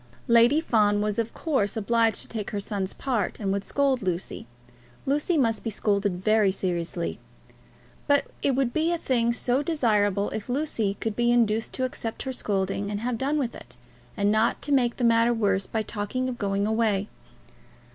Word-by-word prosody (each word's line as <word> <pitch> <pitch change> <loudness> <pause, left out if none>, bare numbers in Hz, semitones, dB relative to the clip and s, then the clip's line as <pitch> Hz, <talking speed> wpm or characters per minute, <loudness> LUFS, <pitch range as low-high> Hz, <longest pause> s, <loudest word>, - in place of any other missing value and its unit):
Lady 235 +5 +5
Fawn 210 -9 +2
was 210 +1 -1
of 230 0 -1
course 265 - -1
obliged 225 0 +1
to - - -8
take 215 -3 -5
her 205 - -3
son's 195 -2 -3
part, 250 -6 -2
and 200 -3 -1
would 200 0 -2
scold 275 -3 +1
Lucy. 180 - -3 0.6
Lucy 295 +5 +1
must 230 -5 +1
be 225 - -2
scolded 200 -3 0
very 215 -2 +4
seriously. 175 -2 -3 0.9
But 285 -1 +3 0.2
it 275 - +2
would 260 -2 0
be 320 +2 +1
a 345 - +1
thing 240 -6 +1
so 245 +2 0
desirable 210 - +1
if 215 +2 -5
Lucy 245 -7 -1
could 220 -2 -2
be 240 +1 +2
induced 225 -2 +2
to 260 - -2
accept 235 -3 -4
her 265 - -3
scolding 195 -2 -1
and 205 0 -3
have 235 -1 -2
done 285 +3 0
with 250 -5 -1
it, - - -12 0.4
and 205 0 +2
not 220 +2 +2
to 290 - -4
make 250 -3 +2
matters 230 0 +3
worse 200 -3 +1
by 220 -1 -1
talking 225 +5 -3
of 250 -2 -5
going 200 -1 0
away! 215 -2 +1
225 Hz, 180 wpm, -26 LUFS, 205-255 Hz, 0.9 s, Lady